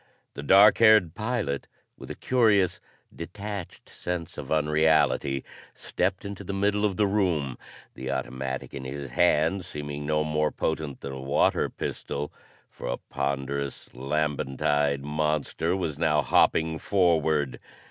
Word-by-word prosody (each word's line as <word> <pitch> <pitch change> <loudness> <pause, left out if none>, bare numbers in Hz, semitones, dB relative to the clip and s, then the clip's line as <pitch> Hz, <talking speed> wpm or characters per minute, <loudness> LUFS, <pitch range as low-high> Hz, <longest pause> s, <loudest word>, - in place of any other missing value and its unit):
The - - -7
dark 100 +8 +6
haired 110 -7 +6
pilot, 110 - -2 0.3
with - - -11
a - - -5
curious, 110 -8 +2 0.4
detached 100 +2 -7
sense 90 -2 -5
of - - -8
unreality, 75 -3 +2 0.3
stepped 95 +2 -2
into 100 0 -6
the 100 +1 -4
middle 105 +1 +1
of 100 -3 -1
the 105 - +3
room, 90 -10 0 0.4
the 65 - -6
automatic 65 0 -4
in 70 - -6
his 70 0 -6
hand 85 +3 +2
seeming 75 -3 -6
no 75 0 +1
more 75 0 0
potent 80 -3 -3
than 70 - -5
a 65 0 -6
water 70 +1 +2
pistol, 75 +1 -5 0.3
for - - -9
a - - -1
ponderous, 70 0 -4
lambent 70 0 -2
eyed 70 -1 +2
monster 75 +3 -1
was 80 -6 -3
now 75 -3 +2
hopping 80 0 +2
forward. 80 -7 +1
75 Hz, 135 wpm, -26 LUFS, 70-95 Hz, 0.4 s, dark